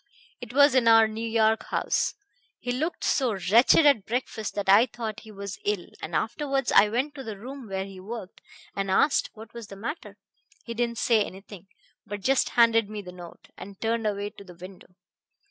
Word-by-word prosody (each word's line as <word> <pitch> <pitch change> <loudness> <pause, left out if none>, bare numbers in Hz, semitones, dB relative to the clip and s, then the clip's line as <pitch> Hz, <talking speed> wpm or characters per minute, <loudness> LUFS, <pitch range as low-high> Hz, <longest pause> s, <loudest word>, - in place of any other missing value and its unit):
It 245 -2 -9
was 285 +1 +5
in 255 -3 +3
our 225 -1 +7
New 220 +1 -5
York 220 0 +2
house. - - 0 0.4
He 245 - -3
looked 310 +8 -3
so 255 -5 +1 0.2
wretched 240 +7 +6
at 265 -9 +4
breakfast 225 -2 -3
that 205 -1 -3
I 205 +6 +6
thought 225 -2 -6
he 220 - -13
was 200 -1 -7
ill, 205 -4 -2
and - - -5
afterwards 275 +3 -1
I 210 - +6
went 260 +7 -1
to 275 -2 -8
the 220 -4 -7
room 255 +3 -9
where 190 -1 -3
he 195 -1 -11
worked, 200 0 -8 0.3
and 195 -1 -2
asked 275 +9 +2
what 220 0 -12
was 235 -3 -9
the 200 - -10
matter. 235 - -7 0.5
He 235 - -6
didn't 235 0 -2
say 225 -2 +3
anything, 195 -1 -11 0.4
but 205 0 -6
just 270 +5 +2
handed 230 -2 +4
me 210 -1 -6
the 180 - -9
note, 175 -1 -13
and 195 0 -11
turned 225 0 -1
away 205 0 -3
to - - -13
the 180 -3 -14
window. 180 0 -13
220 Hz, 195 wpm, -26 LUFS, 200-240 Hz, 0.5 s, our